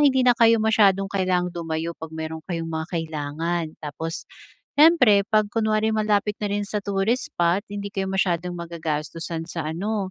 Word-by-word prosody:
hindi 265 -3 +4
na 245 - +8
kayo 230 0 +6
masyadong 200 -3 +4
kailangang 185 -2 +1
dumayo 165 -1 -3
'pag 160 0 -7
mayro'n 160 0 -5
kayong 165 -2 -3
mga 160 0 -3
kailangan. 165 +1 -2 0.2
Tapos 160 +2 -5 0.5
siyempre 260 -11 +6
'pag 215 -1 +4
kunwari 220 -1 +2
malapit 210 -1 +1
na 205 - 0
rin 205 0 -1
sa 210 +1 -2
tourist 200 +5 0
spot 175 +3 +2
hindi 200 0 -4
kayo 195 -1 -1
masyadong 180 -2 0
magagastusan 165 0 -4
sa 165 -3 -4
ano, 200 +2 -2
185 Hz, 160 wpm, -24 LUFS, 165-210 Hz, 0.5 s, na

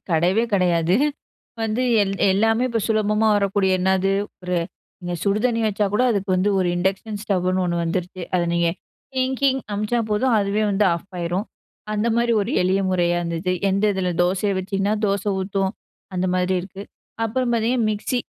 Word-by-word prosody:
கெடையவே 180 +7 +2
கெடையாது. 180 -1 +2 0.7
வந்து 225 +2 -1 0.5
எல்லாமே 225 +4 +2
இப்போ 230 -1 0
சுலபமா 215 0 +2
வரக்கூடிய 200 -1 +1
என்னது 190 +1 +2 0.3
ஒரு 180 0 -1 0.5
இங்க 175 0 -4
சுடு 200 +1 +1
தண்ணி 230 -2 +1
வச்சா 210 0 0
கூட, 210 - +2
அதுக்கு 200 -2 -2
வந்து 185 +3 +2
ஒரு 185 - +1
இண்டக்ஷன் 195 +4 -2
ஸ்டவ்வுன்னு 185 -2 0
ஒண்ணு 175 -1 -1
வந்துருச்சு. 180 +2 -3
அதை 175 - +2
நீங்க 170 0 +2 0.5
டிங்டிங் 265 +1 +1
அனுப்பிச்சா 215 +4 0
போதும் 230 +3 +2
அதுவே 205 +1 0
வந்து 200 +1 +2
ஆஃப் 170 +3 -7
ஆகிடும். 175 +4 -2 0.5
அந்தமாரி 235 +2 +1
ஒரு 210 +5 -3
எளிய 185 +2 +2
முறையா 175 -1 +1
இருந்தது. 170 +1 -2 0.2
எந்த 195 +2 0
இதில 185 -2 -1
தோசையை 190 +3 0
வச்சிங்கன்னா 195 +2 -1
தோசை 200 0 0
ஊத்தூம் 195 0 -1 0.4
அந்த 180 0 0
மாதிரி 180 +1 +1
இருக்குது. 195 +2 -10 0.4
அப்புறம் 245 +2 -1
பார்த்திங்க 235 +2 +1
மிக்ஸி, 215 +4 -1
195 Hz, 155 wpm, -22 LUFS, 185-215 Hz, 0.7 s, கெடையவே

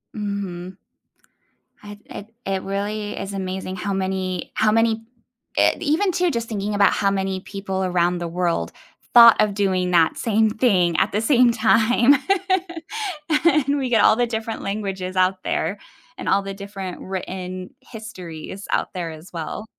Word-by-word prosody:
Mhm. 195 -3 -5 1.1
I 205 0 -9
it 210 +2 -10
it 195 -1 -1
really 205 +2 -3
is 195 0 -5
amazing 190 -1 -4
how 200 0 -3
many 190 -1 -2
how 215 -1 +3
many 225 0 +2 0.5
eh, - - +4
even, 345 +5 +1
too, 355 -1 +1
just 235 -2 -3
thinking 205 -1 -2
about 200 -1 +4
how 200 -1 +1
many 190 -1 -1
people 195 -1 -4
around 180 -1 +1
the 170 - -3
world 170 0 -1 0.4
thought 235 -2 +9
of 210 -1 +2
doing 185 -3 0
that 165 -2 +3
same 220 -1 +2
thing 185 -8 +2
at - - +2
the 210 - 0
same 245 -1 +4
time. 230 +4 +4 1.3
And 290 -3 +3
we 265 -2 -1
get 230 - +4
all 215 - +6
the 245 - +2
different 225 0 -4
languages 195 -2 -4
out 185 0 +1
there 195 +6 -1 0.4
and - - -7
all 200 - +3
the 195 - -5
different 195 -2 -7
written 185 -1 -6
histories 190 -5 -9
out - - -1
there, 175 -3 -4
as 160 +3 -12
well. 170 +6 -5
195 Hz, 160 wpm, -22 LUFS, 185-220 Hz, 1.3 s, thought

